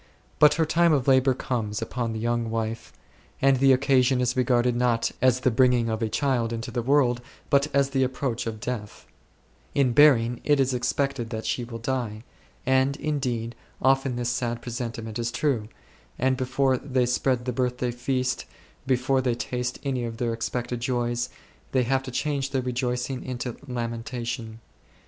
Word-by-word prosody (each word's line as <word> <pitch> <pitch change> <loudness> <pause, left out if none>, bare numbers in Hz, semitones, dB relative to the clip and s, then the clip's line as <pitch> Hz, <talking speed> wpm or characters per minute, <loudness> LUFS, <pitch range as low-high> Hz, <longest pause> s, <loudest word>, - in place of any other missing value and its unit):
But 150 - +7
her 160 0 +2
time 165 +1 +3
of 135 -3 +1
labour 130 -1 +4
comes 110 -5 -2
upon 115 +1 -3
the 110 - -4
young 120 0 -1
wife; 115 0 -3 0.5
and 135 -1 +4
the 135 +1 +5
occasion 130 -1 +3
is 125 0 +1
regarded 125 -1 +2
not 120 -2 +1
as 130 0 +3
the 130 - +3
bringing 120 -1 +3
of 110 0 -2
a 110 - 0
child 120 -1 0
into 115 +2 -4
the 120 - -1
world, 125 -1 +2 0.3
but 140 +1 +4
as 140 -1 +2
the 135 -1 +1
approach 130 -2 -2
of 110 -1 -4
death; 105 -2 -5 0.7
in 135 -3 +3
bearing 120 -4 +5
it 145 -1 +3
is 135 -1 +2
expected 125 0 -1
that 110 -1 -5
she 125 - -1
will 115 -1 -7
die; 115 -3 -3 0.4
and, 130 +2 +2
indeed, 125 -7 -2 0.3
often 135 -1 +2
this 120 -1 -1
sad 120 -1 -2
presentiment 115 -2 -5
is 120 0 -1
true, 125 -8 0 0.5
and 130 +1 +2
before 130 0 +1
they 130 -3 0
spread 125 0 0
the 125 - -1
birthday 125 0 -1
feast, 125 +1 -1 0.4
before 130 +1 +2
they 125 -2 0
taste 125 +1 -3
any 130 -3 -1
of 115 -1 -5
their 120 -1 -1
expected 120 +1 -3
joys, 120 -1 -1 0.4
they 130 -1 +3
have 130 +2 +1
to 135 - -8
change 140 +1 -1
their 135 -2 -1
rejoicing 125 +1 -2
into 125 -2 -4
lamentation. 115 -1 -4
125 Hz, 170 wpm, -26 LUFS, 120-130 Hz, 0.7 s, But